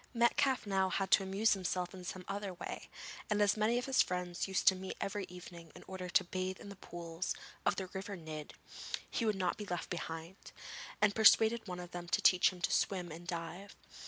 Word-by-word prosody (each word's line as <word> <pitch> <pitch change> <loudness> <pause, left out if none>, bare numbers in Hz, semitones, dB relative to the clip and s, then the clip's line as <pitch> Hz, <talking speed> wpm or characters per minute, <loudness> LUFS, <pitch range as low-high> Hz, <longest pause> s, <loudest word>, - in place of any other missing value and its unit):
Metcalfe 250 +3 +3
now 190 -2 +2
had 195 +1 -1
to - - +7
amuse 195 +3 +3
himself 180 -2 -2
in 185 -1 -9
some 180 0 -6
other 200 -2 -3
way, - - -6 0.4
and 210 -1 +2
as 205 -1 +4
many 220 +2 +2
of 245 - -1
his 270 -1 +4
friends 180 0 -1
used 190 -1 -1
to 190 - +10
meet 185 0 -6
every 200 0 -2
evening 175 -2 -11
in - - -11
order 185 -1 -6
to - - +4
bathe 185 +1 -3
in 205 - -9
the 200 - -8
pools 170 -1 -4 0.3
of - - +4
the 190 - -3
river 195 +2 -6
Nidd, 155 -2 -7 0.5
he 230 - -1
would 215 - +2
not 185 -2 0
be 210 - -5
left 175 -2 -3
behind, 165 +2 -6 0.5
and 205 -1 +5
persuaded 220 +1 +6
one 180 -1 -5
of 175 -1 -8
them 175 0 -6
to - - +2
teach 180 0 +6
him 180 -1 -12
to - - +1
swim 180 -3 +1
and 170 +2 -9
dive. 170 +3 -5
185 Hz, 215 wpm, -35 LUFS, 175-200 Hz, 0.5 s, to